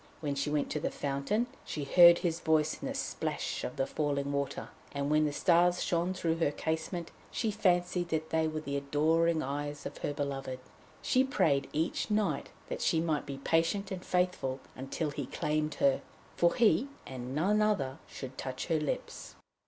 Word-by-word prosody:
When 145 -3 -2
she 140 +1 -1
went 150 -1 0
to 150 - -1
the - - -1
fountain, 140 - -1 0.2
she 150 - -4
heard 170 +4 +8
his 170 -2 -1
voice 155 -1 +1
in - - -3
the - - -3
splash - - -2
of 125 - -4
the 135 - 0
falling 140 -2 -1
water, 140 -1 -2 0.2
and 140 0 -1
when 155 0 +4
the 150 - 0
stars 175 +3 +3
shone 175 +2 0
through 165 -3 0
her 165 -3 +2
casement, 160 +3 -3 0.2
she 225 -2 -1
fancied 180 -3 +1
that 160 -1 -2
they 160 -1 +2
were 155 0 -3
the 140 -2 -2
adoring 160 +4 +2
eyes 145 +2 -4
of - - -6
her - - -2
beloved. 135 -2 -3 0.5
She 255 - +4
prayed 140 - +1
each 160 +7 -1
night 205 -9 0 0.2
that - - -4
she 160 - +2
might 160 -3 0
be 140 - -5
patient 165 +7 +1
and 185 -1 -4
faithful 180 -8 0 0.2
until 135 +4 -3
he 140 -3 -4
claimed 150 0 -1
her, 140 -1 +3 0.3
for 170 0 +3
he, 230 - +4 0.2
and 130 0 -6
none 200 +7 +3
other, 140 -11 +1
should 130 -1 -8
touch 130 0 -4
her 160 -2 +3
lips. 150 -2 -4
155 Hz, 185 wpm, -31 LUFS, 140-175 Hz, 0.5 s, heard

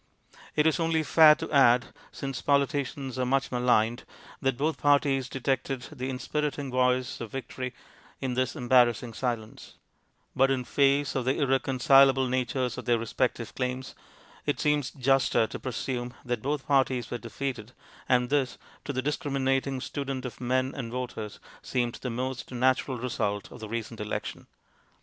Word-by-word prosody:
It 150 - +3
is 160 +2 +3
only 165 -1 +1
fair 155 0 +7
to - - -6
add, 125 -4 +4 0.2
since 135 -3 -5
politicians 140 -2 0
are 125 - +1
much 135 +1 +1
maligned, 120 -1 +2 0.4
that 135 -2 +1
both 155 +4 -1
parties 140 -3 +2
detected 135 0 -2
the 130 -3 -4
inspiriting 145 +1 -2
voice 125 0 +1
of 115 - -6
victory 130 -1 -5 0.4
in 130 -2 -2
this 130 +3 0
embarrassing 120 -3 +3
silence; 115 -4 -4 0.6
but 135 +1 +4
in 130 -2 0
face 140 +2 +2
of 130 -2 -1
the 130 - +1
irreconcilable 135 -1 +4
natures 125 -1 -1
of - - -8
their 120 -1 +3
respective 115 +1 -2
claims, 130 0 -3 0.5
it - - -1
seems 150 -3 +1
juster 135 -3 +2
to - - -7
presume 125 0 -4
that 120 -3 -2
both 140 +1 -2
parties 130 -4 +1
were 120 - -3
defeated, 120 -1 -5 0.4
and 125 0 +3
this, 140 -3 +1 0.3
to - - -3
the 130 0 -2
discriminating 135 -2 0
student 135 -1 -4
of 125 - -7
men 130 +2 0
and 120 -4 -5
voters, 120 -4 -5 0.2
seemed 120 -2 -1
the 125 - -3
most 130 +2 -4
natural 130 +1 +1
result 105 -4 -2
of - - -10
the 110 -1 -7
recent 115 0 -5
election. 105 0 -5
130 Hz, 155 wpm, -28 LUFS, 125-135 Hz, 0.6 s, fair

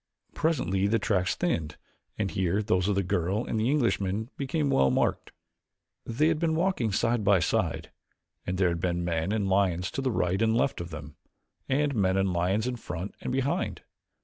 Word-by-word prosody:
Presently 100 - +1
the 115 +3 +2
tracks 100 -4 0
thinned 80 - -2 0.4
and 100 -3 -1
here 95 +3 0
those 90 -2 +1
of 105 - +1
the 100 - +1
girl 90 +5 0
and 110 - -2
the 110 +3 +1
Englishman 110 -5 0
became 140 +1 -1
well 65 0 +4
marked. 65 - 0 0.8
They 145 +7 +2
had 160 -2 0
been 160 -1 +1
walking 165 - +1
side 115 +3 +1
by 100 -1 +5
side 85 0 -1 0.6
and 90 +1 -1
there 90 -1 +3
had 85 -1 -2
been 85 0 -1
men 85 +2 -1
and 105 -2 0
lions 95 -2 +1
to - - -3
the 135 - 0
right 95 -3 0
and 115 0 +3
left 130 -6 0
of 85 - -6
them, 75 -2 -9 0.5
and 145 +1 +1
men 95 -4 +2
and 95 -1 +1
lions 95 +6 +1
in 125 -1 -2
front 90 -3 -6
and - - -3
behind. 135 +2 -1
100 Hz, 190 wpm, -28 LUFS, 90-125 Hz, 0.8 s, by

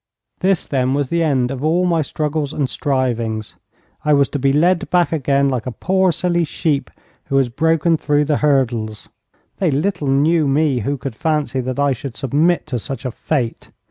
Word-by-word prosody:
This, 190 -2 +1
then, 130 -1 0
was 140 -2 -1
the 170 0 0
end 135 -6 +1
of 135 0 -5
all 170 +4 +2
my 170 -2 +2
struggles 150 0 -2
and 140 -3 0
strivings. 120 -6 -2 0.5
I 150 - +3
was 140 -1 +3
to 145 - -3
be 135 +1 +2
led 170 +5 +2
back 175 -1 +2
again 140 -3 +1
like 130 -4 -2
a - - -2
poor 190 +7 +1
silly 175 +1 0
sheep 145 -3 -1 0.4
who 135 - 0
has 135 -3 +2
broken 160 +5 +2
through 150 -1 +1
the 150 -1 +1
hurdles. 120 -7 0 0.5
They 185 -4 +2
little 155 +2 -1
knew 150 +3 +3
me 140 -1 +2
who 140 +6 -2
could 135 -1 -5
fancy 150 +1 -1
that 130 +1 -4
I 145 0 +3
should 130 -3 -5
submit 155 +7 +1
to 130 -6 -3
such 135 +2 -6
a 130 - -2
fate. 125 -2 -3
145 Hz, 190 wpm, -19 LUFS, 130-160 Hz, 0.5 s, I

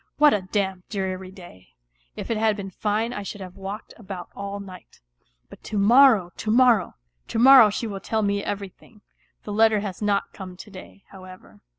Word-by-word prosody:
What 295 -1 +5
a 205 - 0
damp, 190 -1 -3
dreary 190 -2 -4
day! 175 - -15 0.4
If - - -6
it 225 - 0
had 220 -1 +1
been 195 -1 -7
fine 215 +5 -2
I 205 - -5
should 205 +1 -8
have 185 -1 -10
walked 195 +2 -8
about 190 -5 -9
all 200 0 -6
niirht.... 185 -2 -13 0.5
But - - -15
to 215 - -4
morrow, 220 -3 +5
to 220 - -5
morrow! 235 -4 +3 0.3
To - - -4
im>rrmv 250 -2 +8
she 230 - -4
will 200 -3 -5
tell 220 +3 -2
me 200 0 -1 0.2
< 195 -2 -11
thing. 210 -2 -21 0.4
The 210 - -6
letter 220 -1 +3
has 200 -2 -6
not 200 -1 -1
come 185 -2 -10
to 210 - -12
day, 195 +1 -13
however. 185 - -14
200 Hz, 195 wpm, -23 LUFS, 190-220 Hz, 0.5 s, im>rrmv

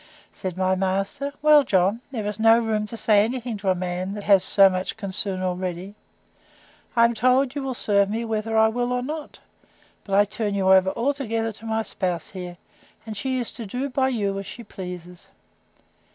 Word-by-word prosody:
Said 185 -2 -5
my 185 0 +2
master, 195 +9 -1
Well, 300 -1 +7
John, 195 0 +1
there 230 -6 -4
is 210 0 -4
no 225 +1 +6
room 220 -2 -1
to 230 - -4
say 210 -2 +4
any 245 +4 -2
thing 240 -1 -5
to 195 -1 -2
a 185 - +3
man 180 +2 -3
that 205 - -6
has 195 -2 +5
so 195 0 +6
much 185 +2 -2
concern 195 -2 -2
already: 185 +1 -3 1.0
I 230 -1 +6
am 235 - +2
told 255 +3 +2
you 285 - -3
will 265 -2 -3
serve 200 -3 +2
me 225 +2 -2
whether 220 0 -2
I 220 0 +6
will 245 +2 -1
or 250 0 -1
not; 300 +3 -6 0.7
but 195 - -2
I 205 +1 +5
turn 205 0 -3
you 190 -1 +4
over 190 0 +5
altogether 230 -2 -1
to 220 +1 -11
my 220 0 0
spouse 180 -5 -3
here: 180 -2 -7 0.5
and 220 -1 -6
she 260 +4 -2
is 245 -2 -1
to 230 -4 -6
do 260 +7 -3
by 260 +1 +1
you 200 -5 -1
as 195 - -7
she 235 - -9
pleases. 180 -3 -9
210 Hz, 200 wpm, -24 LUFS, 190-235 Hz, 1.0 s, Well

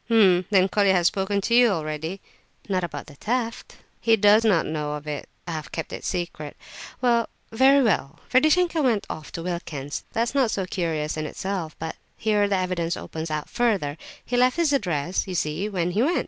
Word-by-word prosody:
"H'm! 190 -6 +5
then 190 -2 +4
Colia 200 0 +3
has 175 -2 +2
spoken 200 +2 +1
to 235 - -1
you 245 0 +7
already?" 160 +1 -3 0.5
"Not 185 -3 0
about 145 -4 -5
the 145 - -13
theft." 230 - -3 0.2
"He 225 -1 +4
does 210 +1 +5
not 200 -7 +3
know 150 -1 -3
of 150 0 -6
it; 150 -2 -5 0.2
I - - -3
have 155 -2 -5
kept 165 - -5
it - - -5
a - - -5
secret. 170 -5 -4 0.5
Very 250 +3 +3
well, 165 - 0
Ferdishenko 320 +5 +3
went 235 -7 +2
off 155 - -8
to 165 - -5
Wilkin's. 155 -5 -4
That 225 - +2
is 235 - -3
not 270 -4 +3
so 195 -3 -1
curious 160 -5 -2
in 155 0 -2
itself, 185 -3 -4
but 160 0 -5 0.2
here 210 -1 +2
the 200 -1 +1
evidence 180 -2 -1
opens 160 0 -6
out 155 -1 -3
further. 210 - 0 0.3
He 245 - -2
left 250 +4 +3
his 330 -4 +2
address, 180 - 0
you 185 - -4
see, 165 +5 -1
when 180 -3 -1
he 205 +5 +1
went. 320 +8 +2
190 Hz, 200 wpm, -24 LUFS, 160-225 Hz, 0.5 s, you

